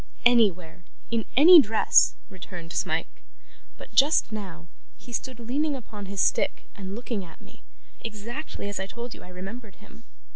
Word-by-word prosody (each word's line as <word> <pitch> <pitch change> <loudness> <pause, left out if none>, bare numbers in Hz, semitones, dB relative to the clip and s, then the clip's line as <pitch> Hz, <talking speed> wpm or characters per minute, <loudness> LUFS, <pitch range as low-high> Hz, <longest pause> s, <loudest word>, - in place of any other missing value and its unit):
'Anywhere 190 -8 +2 0.3
in 230 -2 0
any 330 +3 +10
dress,' 220 -3 +4
returned 175 -4 -10
Smike; - - -3 0.6
'but, - - -13
just 280 -4 +4
now, 185 -6 -7 0.3
he 245 - -13
stood 255 0 -4
leaning 280 +6 -1
upon 215 -5 -9
his 200 0 -6
stick - - +1
and 195 0 -7
looking 230 -3 -4
at 165 -2 -14
me, - - -18 0.4
exactly 230 +3 -7
as 205 -1 -4
I 190 - -4
told 235 +2 -7
you - - -13
I - - -13
remembered 195 +4 -9
him. 230 +2 -18
215 Hz, 155 wpm, -26 LUFS, 190-240 Hz, 0.6 s, any